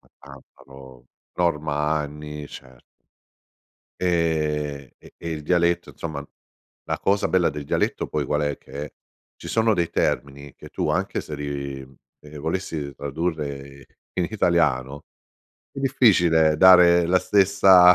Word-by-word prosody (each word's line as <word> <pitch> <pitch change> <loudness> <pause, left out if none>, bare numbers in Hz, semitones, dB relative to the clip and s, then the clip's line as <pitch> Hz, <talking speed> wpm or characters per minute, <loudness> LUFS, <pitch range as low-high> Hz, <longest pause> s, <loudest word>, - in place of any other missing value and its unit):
ma - - -28
tanta 70 -1 -16
pro 70 0 -14 0.6
Normanni 75 -2 -1 0.2
cer 65 -2 -13 1.2
Ehm, 75 -5 -1
e - - -17
e 85 - -6
il 75 -1 -5
dialetto, 85 +1 +1
insomma 75 -3 -6 0.6
la - - -3
cosa 100 +1 +1
bella 90 -2 +2
del 75 -1 -7
dialetto - - -1
poi - - -2
qual 75 0 -1
è? 75 -1 -1
Che 70 +2 -9 0.4
ci - - -10
sono 110 -1 +2
dei 85 -2 -1
termini 70 +1 -2
che - - -13
tu - - -3
anche - - -1
se 75 - -8
li, 70 -2 -5
mhmm, 65 0 -21 0.2
ehm, 75 0 -12
volessi 80 -4 -4
tradurre 70 -2 -5 0.3
in 90 -2 -1
italiano 75 -8 0 0.7
è - - -10
difficile 85 - +3
dare 90 -1 +7
la 90 +1 +3
stessa 95 -2 +6
75 Hz, 135 wpm, -23 LUFS, 70-90 Hz, 1.2 s, dare